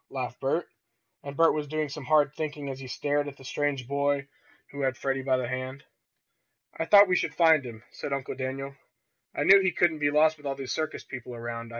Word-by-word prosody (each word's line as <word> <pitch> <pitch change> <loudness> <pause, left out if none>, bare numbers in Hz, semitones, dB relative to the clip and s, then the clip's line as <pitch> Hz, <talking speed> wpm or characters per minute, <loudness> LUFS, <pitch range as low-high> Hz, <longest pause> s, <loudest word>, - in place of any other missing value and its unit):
laughed - - -5
Bert. - - 0 0.6
And 140 0 -8
Bert 165 0 +5
was 150 -1 -3
doing 155 0 -2
some 145 0 -7
hard 150 0 +3
thinking 150 -2 -4
as 135 -1 -6
he 135 - -8
stared 145 +3 -1
at 140 - -8
the - - -14
strange 140 -3 -2
boy 140 0 0 0.4
who 140 - -6
had 130 -1 0
Freddie 135 -1 -1
by 130 -1 +1
the 125 -1 -2
hand. 130 +2 -5 0.9
"I 160 - -2
thought 205 +3 +8
we 180 - +2
should - - -1
find 160 -4 +5
him," 115 -2 -9
said - - -6
Uncle 140 -1 -3
Daniel. 135 +1 -5 0.6
"I - - 0
knew 195 +1 +8
he 190 - +2
couldn't 165 -2 +1
be 145 -1 +2
lost 155 +2 +3
with 145 -1 -8
all 135 - -2
these 135 -1 -6
circus 155 -1 -3
people 125 -2 -8
around. 115 0 -6
140 Hz, 220 wpm, -27 LUFS, 130-150 Hz, 0.9 s, thought